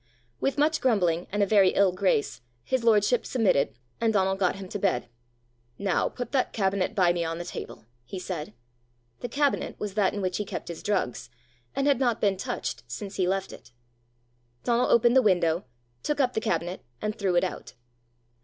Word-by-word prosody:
With 275 Hz, -, 0 dB
much 310 Hz, +2 st, +2 dB
grumbling, 180 Hz, -9 st, +2 dB
and 205 Hz, +1 st, +2 dB
a -, -, +4 dB
very 195 Hz, -2 st, +4 dB
ill 195 Hz, -2 st, +4 dB
grace, 180 Hz, -9 st, 0 dB, 0.2 s
his 260 Hz, -, -1 dB
lordship 225 Hz, +1 st, +4 dB
submitted, 195 Hz, -, +1 dB, 0.2 s
and 225 Hz, -1 st, +2 dB
Donal 190 Hz, -2 st, +2 dB
got 190 Hz, -2 st, +1 dB
him 195 Hz, -1 st, -8 dB
to 205 Hz, -, -4 dB
bed. 180 Hz, -12 st, 0 dB, 0.7 s
"Now 195 Hz, -3 st, +1 dB
put 245 Hz, -, -6 dB
that 265 Hz, -3 st, +1 dB
cabinet 195 Hz, -2 st, 0 dB
by 180 Hz, -3 st, +4 dB
me 175 Hz, -1 st, -1 dB
on 165 Hz, 0 st, -3 dB
the 175 Hz, -, -5 dB
table," -, -, -7 dB, 0.2 s
he 190 Hz, -, -7 dB
said. 170 Hz, -, -5 dB, 0.6 s
The 245 Hz, -, -5 dB
cabinet 285 Hz, +3 st, 0 dB
was 210 Hz, -2 st, -4 dB
that 200 Hz, -1 st, +2 dB
in -, -, -2 dB
which 185 Hz, -1 st, -1 dB
he 210 Hz, -, -1 dB
kept 195 Hz, -, -6 dB
his 170 Hz, -, -6 dB
drugs, 185 Hz, -13 st, -1 dB, 0.5 s
and 275 Hz, -, 0 dB
had 280 Hz, -3 st, +3 dB
not 240 Hz, -4 st, +1 dB
been 200 Hz, -2 st, +2 dB
touched 120 Hz, -9 st, -4 dB
since 195 Hz, -, -6 dB
he 185 Hz, -2 st, +2 dB
left 195 Hz, +1 st, -1 dB
it. -, -, -14 dB, 0.9 s
Donal 240 Hz, +1 st, +2 dB
opened 240 Hz, +1 st, +5 dB
the 265 Hz, -, +7 dB
window, 175 Hz, -5 st, +2 dB, 0.4 s
took 295 Hz, -1 st, -1 dB
up 255 Hz, -2 st, +2 dB
the 220 Hz, -, -1 dB
cabinet, 175 Hz, 0 st, -2 dB, 0.2 s
and 215 Hz, 0 st, -2 dB
threw 195 Hz, -5 st, 0 dB
it 175 Hz, -, +4 dB
out. 185 Hz, -, -5 dB
195 Hz, 190 wpm, -27 LUFS, 180-230 Hz, 0.9 s, the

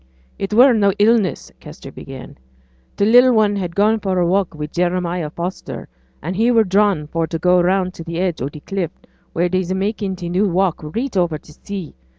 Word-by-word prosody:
'It 195 Hz, -, -3 dB
were 245 Hz, +4 st, +6 dB
no 200 Hz, -3 st, +3 dB
illness,' 210 Hz, -2 st, +2 dB
Kester -, -, -11 dB
began. -, -, -10 dB, 0.6 s
'T' 200 Hz, -, +2 dB
little 245 Hz, +1 st, +6 dB
un 205 Hz, -1 st, +2 dB
had 180 Hz, -4 st, -4 dB
gone 215 Hz, +2 st, +3 dB
for 190 Hz, -3 st, -1 dB
a 175 Hz, -, +2 dB
walk 185 Hz, -1 st, 0 dB
wi' 150 Hz, 0 st, -4 dB
Jeremiah 175 Hz, 0 st, -1 dB
Foster, 175 Hz, +4 st, -6 dB, 0.4 s
an' 170 Hz, +4 st, -3 dB
he 225 Hz, +5 st, +2 dB
were 230 Hz, -2 st, +4 dB
drawn 195 Hz, -5 st, +2 dB
for 165 Hz, +2 st, -2 dB
to 165 Hz, -, -3 dB
go 180 Hz, +2 st, +3 dB
round 185 Hz, +1 st, +1 dB
t' 165 Hz, 0 st, -7 dB
edge 180 Hz, -6 st, -1 dB
o' 130 Hz, -, -1 dB
t' 150 Hz, +1 st, -11 dB
cliff, 190 Hz, -2 st, -3 dB, 0.5 s
wheere 175 Hz, +2 st, +2 dB
they's 185 Hz, 0 st, -1 dB
makin' 195 Hz, 0 st, -2 dB
t' 180 Hz, -1 st, -6 dB
new 185 Hz, +4 st, +1 dB
walk 185 Hz, -1 st, +1 dB
reet 225 Hz, -, -4 dB
o'er 175 Hz, -4 st, +1 dB
t' 150 Hz, -, -18 dB
sea. 195 Hz, -1 st, -7 dB
185 Hz, 195 wpm, -19 LUFS, 170-205 Hz, 0.6 s, were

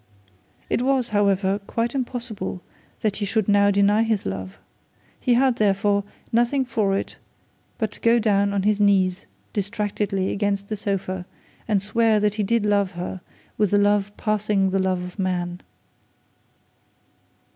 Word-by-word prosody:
It -, -, 0 dB
was, 260 Hz, -1 st, +1 dB
however, 200 Hz, -1 st, +2 dB
quite 235 Hz, 0 st, -1 dB
impossible 240 Hz, -8 st, -4 dB, 0.4 s
that 210 Hz, -2 st, 0 dB
he 205 Hz, -, -2 dB
should 215 Hz, 0 st, 0 dB
now 205 Hz, 0 st, +4 dB
deny 200 Hz, +2 st, +3 dB
his 225 Hz, -3 st, 0 dB
love. 95 Hz, 0 st, -5 dB, 0.6 s
He 245 Hz, -, +2 dB
had, 255 Hz, -1 st, +3 dB
therefore, 200 Hz, 0 st, +2 dB, 0.3 s
nothing 240 Hz, +4 st, +2 dB
for 215 Hz, -5 st, 0 dB
it, -, -, -5 dB, 0.6 s
but 220 Hz, -3 st, -1 dB
to -, -, -12 dB
go 230 Hz, +1 st, +4 dB
down 200 Hz, -3 st, +2 dB
on 200 Hz, -1 st, 0 dB
his 210 Hz, 0 st, +2 dB
knees 190 Hz, -2 st, +2 dB, 0.3 s
distractedly 205 Hz, -2 st, -1 dB
against 200 Hz, -1 st, -1 dB
the 215 Hz, -, -1 dB
sofa, 190 Hz, -3 st, -3 dB, 0.4 s
and 205 Hz, -3 st, +1 dB
swear 220 Hz, +1 st, +2 dB
that 210 Hz, -1 st, +1 dB
he 215 Hz, -, -2 dB
did 230 Hz, +1 st, +1 dB
love 200 Hz, -2 st, +1 dB
her 180 Hz, +1 st, -5 dB, 0.4 s
with 210 Hz, -3 st, +2 dB
a -, -, +5 dB
love 205 Hz, 0 st, +2 dB
passing 210 Hz, -2 st, +1 dB
the 195 Hz, -, +1 dB
love 185 Hz, -1 st, 0 dB
of 180 Hz, +3 st, -9 dB
man.' 180 Hz, -1 st, -2 dB
205 Hz, 150 wpm, -23 LUFS, 195-220 Hz, 0.6 s, a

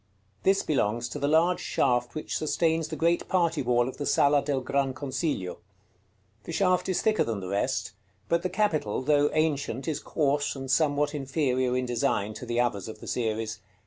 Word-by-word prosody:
This 195 Hz, +1 st, +3 dB
belongs 120 Hz, -5 st, 0 dB
to 145 Hz, -, -5 dB
the 140 Hz, -, 0 dB
large 165 Hz, +4 st, +3 dB
shaft 125 Hz, -1 st, 0 dB
which 155 Hz, -, -4 dB
sustains 160 Hz, +1 st, +1 dB
the -, -, -5 dB
great 170 Hz, +1 st, +1 dB
party 170 Hz, -4 st, +2 dB
wall 120 Hz, -1 st, +2 dB
of 130 Hz, -, -6 dB
the 145 Hz, -, -3 dB
Sala 145 Hz, 0 st, +4 dB
del 140 Hz, -2 st, 0 dB
Gran 135 Hz, 0 st, 0 dB
Consiglio. 135 Hz, -, -3 dB, 0.9 s
The -, -, -6 dB
shaft 185 Hz, +1 st, +1 dB
is 185 Hz, -, 0 dB
thicker 215 Hz, -1 st, +3 dB
than 115 Hz, -3 st, -3 dB
the 95 Hz, -, -6 dB
rest; 100 Hz, 0 st, -1 dB, 0.4 s
but 170 Hz, 0 st, +1 dB
the 185 Hz, -, -2 dB
capital, 165 Hz, -, 0 dB
though 145 Hz, +1 st, +3 dB
ancient, 145 Hz, -4 st, 0 dB
is 155 Hz, -, -1 dB
coarse 145 Hz, -1 st, 0 dB
and 135 Hz, -1 st, -4 dB
somewhat 145 Hz, +1 st, +2 dB
inferior 130 Hz, -3 st, 0 dB
in 130 Hz, -, -1 dB
design 115 Hz, -3 st, 0 dB
to 125 Hz, -, -8 dB
the 120 Hz, 0 st, 0 dB
others 115 Hz, -5 st, 0 dB
of 110 Hz, -, -8 dB
the -, -, -10 dB
series. 110 Hz, -2 st, -2 dB
140 Hz, 185 wpm, -27 LUFS, 120-160 Hz, 0.9 s, Sala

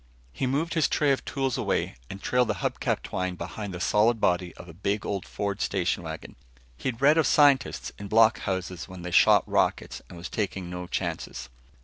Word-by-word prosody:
He 130 Hz, -, -1 dB
moved 150 Hz, +6 st, -1 dB
his 160 Hz, -2 st, +3 dB
tray 145 Hz, -2 st, +2 dB
of 135 Hz, -, 0 dB
tools 135 Hz, -3 st, -1 dB
away -, -, -1 dB
and 95 Hz, -, -7 dB
trailed 125 Hz, +3 st, +1 dB
the -, -, 0 dB
hub -, -, -1 dB
cap -, -, -1 dB
twine 95 Hz, 0 st, -3 dB
behind 95 Hz, +4 st, -6 dB
the 90 Hz, -, -6 dB
solid 110 Hz, +6 st, +3 dB
body 90 Hz, -2 st, +1 dB
of 85 Hz, -, -12 dB
a 85 Hz, -, -11 dB
big 100 Hz, +4 st, -2 dB
old 100 Hz, -2 st, -3 dB
Ford 100 Hz, 0 st, -3 dB
station 95 Hz, -3 st, 0 dB
wagon. 80 Hz, -1 st, -8 dB, 0.4 s
He'd 125 Hz, -, -4 dB
read 150 Hz, +3 st, +6 dB
of 160 Hz, -, +3 dB
scientists 135 Hz, -, +3 dB
in 100 Hz, -, -6 dB
block 110 Hz, +2 st, +5 dB
houses 95 Hz, -3 st, -4 dB
when 90 Hz, -2 st, -10 dB
they 90 Hz, -, -5 dB
shot -, -, +5 dB
rockets -, -, 0 dB
and 90 Hz, -, -10 dB
was 85 Hz, +1 st, -6 dB
taking 95 Hz, -4 st, -3 dB
no 90 Hz, 0 st, -5 dB
chances. 60 Hz, -, -4 dB
100 Hz, 205 wpm, -27 LUFS, 90-125 Hz, 0.4 s, read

